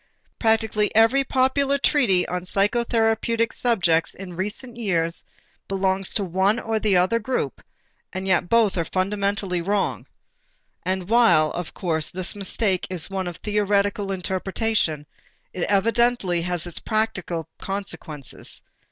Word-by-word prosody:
Practically 220 -2 +2
every 230 +5 +5
popular 270 +1 +2
treatise 245 -11 +3
on 180 0 -3
psychotherapeutic 225 +3 +1
subjects 175 -9 +1
in 185 -2 -9
recent 225 +7 -3
years 170 -7 -1 0.4
belongs 190 0 0
to 205 - +1
the - - -4
one 190 +6 +2
or 225 -2 -1
the 205 -4 +2
other 190 +6 +2
group; 250 +3 -3 0.5
and 190 0 -4
yet 185 -2 +1
both 225 -5 +3
are 165 - 0
fundamentally 195 0 -1
wrong. 200 +3 -1 0.7
And 185 0 -2
while, 180 -10 +4
of 175 -2 -6
course, 160 -4 -1
this 185 +2 -2
mistake 195 -1 +1
is 185 0 -2
one 190 -1 -2
of 175 -1 -6
theoretical 205 0 0
interpretation, 190 -3 -1 0.5
it 180 - -2
evidently 205 -3 +2
has 175 -1 -2
its 175 -2 -4
practical 190 -7 -2
consequences. 175 -8 -5
195 Hz, 130 wpm, -23 LUFS, 180-225 Hz, 0.7 s, every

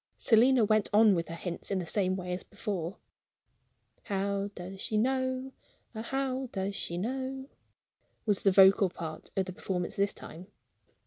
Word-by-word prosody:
Selina 240 +1 +5
went 215 0 +2
on 210 0 +6
with 170 -2 -1
her 165 - -6
hints 170 0 -5
in 195 - 0
the 180 - -2
same 185 +2 +1
way 180 -1 -4
as 180 - -3
before. 185 -3 -4 1.1
"How 200 0 -1
does 190 +2 -8
she 215 - -1
know 260 +2 0 0.4
ah, 220 - -5
how 265 +1 -2
does 195 0 -3
she 170 - -4
know?" 265 +6 -3 0.8
was 205 -3 +1
the 195 - +4
vocal 190 0 +6
part 160 -2 -7
of 190 - +2
the 185 - -7
performance 180 -1 -3
this 200 0 +1
time. 175 +3 -11
200 Hz, 165 wpm, -30 LUFS, 185-235 Hz, 1.1 s, on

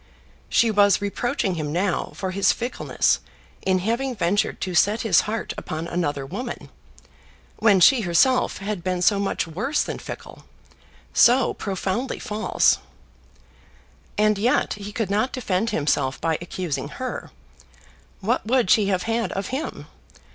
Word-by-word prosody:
She 230 -1 +3
was 200 -2 +4
reproaching 205 +1 -1
him 155 -3 -3
now 180 +3 -1
for 190 -1 -3
his 195 +1 +3
fickleness 240 +2 0 0.4
in 190 -1 +2
having 235 +7 -1
ventured 200 +1 0
to 185 - -3
set 205 +5 +3
his 190 -8 +4
heart 225 +1 -3
upon 160 +2 -5
another 145 -6 -2
woman, 225 - -6 0.9
when 205 -4 +4
she 245 +7 +6
herself 220 +8 +2
had 200 -3 -4
been 180 -1 -1
so 200 +2 +4
much 200 - -1
worse 210 - -1
than - - -5
fickle, - - -9 0.7
so 245 +1 +5
profoundly 200 +5 -3
false! 215 +1 +1 1.4
And 210 -1 +3
yet 240 +5 +2
he 205 0 -7
could 210 -2 -2
not 215 +6 +1
defend 220 -3 -1
himself 145 -7 0
by 160 -1 0
accusing 170 -6 -4
her. 255 0 -5 0.9
What 230 +6 0
would 245 -5 +2
she 210 -3 +4
have 185 -2 0
had 230 0 -1
of 195 0 -3
him? 275 +5 -4
200 Hz, 140 wpm, -23 LUFS, 180-230 Hz, 1.4 s, she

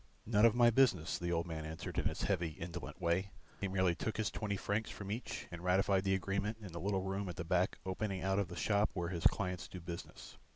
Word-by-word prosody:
"None 110 +1 +6
of 115 - +2
my 120 -1 +6
business," 110 -10 +3
the 85 0 -1
old 85 -1 +1
man 80 -2 -4
answered 80 +1 -4
in - - -2
his - - -3
heavy 90 -4 +1
indolent 85 +2 -6
way. 90 +2 +1 0.3
He 100 - -1
merely 95 -2 +2
took 110 +5 -3
his 110 - 0
twenty 100 -2 -2
francs 105 +3 -1
from 100 -1 -6
each 115 +4 -4
and 85 0 -7
ratified 95 +1 +3
the 95 0 +3
agreement 100 +3 -1
in 100 -4 -8
the 85 - -5
little 95 0 0
room 95 0 -2
at 85 - -5
the 85 - -3
back 90 +2 +1
opening 95 -1 -2
out 95 +1 +2
of 100 - 0
the 90 - -8
shop 105 +3 +2
where 85 -2 -1
his 85 -2 +4
clients 90 -4 -2
do 90 - -8
business. 85 0 -8
95 Hz, 240 wpm, -36 LUFS, 85-100 Hz, 0.3 s, None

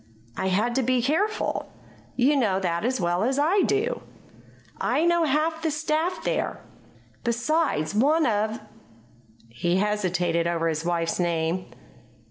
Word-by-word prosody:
"I 190 - -2
had 210 +6 +1
to - - +3
be 255 0 +2
careful. 395 - -1 0.4
You 265 +4 +3
know 210 -8 +2
that 170 -2 -1
as 255 +2 0
well 175 +2 0
as 260 +3 0
I 335 +8 +3
do. 435 +6 0 0.8
I 320 - +1
know 345 -1 +3
half 315 +3 0
the 320 - 0
staff 310 +3 -1
there. - - -1 0.6
Besides, 240 - 0
one 295 +9 +3
of 215 0 0 0.5
" 115 -1 -30
He 170 +10 -1
hesitated 180 -5 0
over 165 -1 0
his 160 0 -2
wife's 170 0 -1
name. 170 +1 0
220 Hz, 140 wpm, -25 LUFS, -, 0.8 s, to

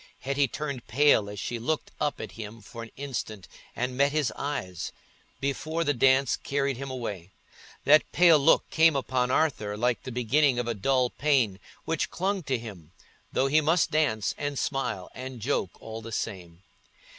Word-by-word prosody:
Hetty 140 +1 +1
turned 140 -1 -5
pale 125 -5 +4
as 105 -1 -7
she 120 +3 -3
looked 150 +7 -2
up 150 -1 -1
at 110 - -6
him 110 +1 -8
for 115 +2 -9
an 115 - -8
instant 120 -8 -5 0.3
and 125 +1 -2
met 140 +2 +3
his 150 -2 0
eyes, 95 - -4 0.5
before 155 +4 -1
the 145 -2 +1
dance 130 +1 +3
carried 140 -2 -1
him 135 +1 -5
away. 105 -9 -5 0.6
That 155 +2 +5
pale 170 -3 +6
look 140 +3 +4
came 160 -1 +5
upon 130 -2 0
Arthur 110 -8 0
like 120 +2 +1
the 130 - -7
beginning 125 +3 +2
of 120 -1 -1
a 120 - 0
dull 125 +4 +1
pain, 130 -10 +1 0.3
which 165 - -1
clung 195 +2 -1
to 130 -2 0
him, 95 -8 -10 0.4
though 135 - +1
he 150 +3 +4
must 160 +3 +2
dance 145 -9 +1
and 145 -1 -2
smile 125 -11 -2
and 130 -1 -7
joke 110 -6 -2
all 110 0 -7
the 115 +1 -9
same. 90 -5 -5
130 Hz, 175 wpm, -27 LUFS, 110-145 Hz, 0.6 s, pale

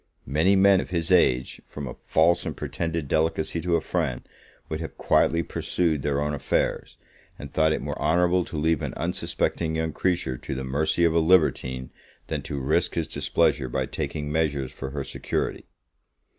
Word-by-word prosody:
Many 80 +9 +3
men 95 0 +5
of - - -8
this 85 -2 -1
age, 65 -8 +3
from 75 -2 -6
a - - -5
false 85 +2 +3
and - - -5
pretended 80 -3 -3
delicacy 80 +2 0
to 85 0 +1
a - - +1
friend, - - -2 0.4
would 80 - -4
have 80 - -7
quietly 85 +1 +2
pursued 80 -4 -1
their 70 0 0
own 75 +1 -1
affairs, 70 - -1 0.4
and 70 - -9
thought 80 0 +3
it - - -1
more - - -4
honourable 90 +3 +3
to 80 - -6
leave 80 0 +1
an - - -4
unsuspecting 80 -1 -1
young 80 -1 -1
creature 85 -9 -1
to - - -5
the 65 - -4
mercy 75 +6 0
of 85 -1 +4
a 85 - +4
libertine, 75 -7 +2 0.4
than - - -2
to 70 - -4
risk 80 +6 +1
his 80 -3 -1
displeasure 65 - +1
by - - -1
taking 75 -1 -4
measures 75 -4 0
for 65 - -6
her 70 0 -4
security. - - -3
80 Hz, 180 wpm, -25 LUFS, 70-85 Hz, 0.4 s, men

